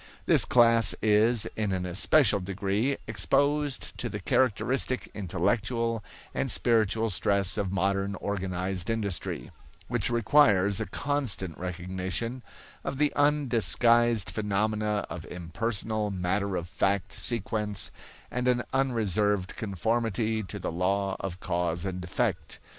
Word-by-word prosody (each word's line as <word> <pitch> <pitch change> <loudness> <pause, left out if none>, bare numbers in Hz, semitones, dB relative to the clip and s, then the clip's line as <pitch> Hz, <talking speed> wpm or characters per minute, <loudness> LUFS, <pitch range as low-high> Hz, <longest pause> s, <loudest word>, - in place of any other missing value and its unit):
This - - +4
class 115 -2 +5
is 110 +1 +4
in 105 -2 -1
an 90 -1 -2
especial 100 - +4
degree 100 +7 -1
exposed 140 +6 0
to - - -2
the - - -5
characteristic 130 +2 +1
intellectual 110 +4 -1 0.3
and 135 - -1
spiritual 115 -1 +2
stress 100 +1 +1
of 100 -3 -2
modern 100 +1 0
organized 95 -2 -3
industry, 100 - -3 0.4
which 120 -3 +2
requires 110 -5 +4
a 110 - -3
constant 135 - -2
recognition 95 +7 -3 0.4
of 135 - -4
the 150 0 +2
undisguised 120 -6 +3
phenomena 105 0 0
of 85 - -7
impersonal, 105 +4 -3
matter 95 +1 -1
of 85 - -3
fact 100 +2 -1
sequence 105 -4 -2 0.4
and 125 0 -2
an 125 -1 +2
unreserved 105 -7 +1
conformity 110 +2 -1
to 105 0 -7
the 95 - -4
law 95 +3 0
of 90 -2 -5
cause 85 -3 -1
and 90 -1 -4
effect. 90 -4 -2
105 Hz, 120 wpm, -28 LUFS, 95-115 Hz, 0.4 s, class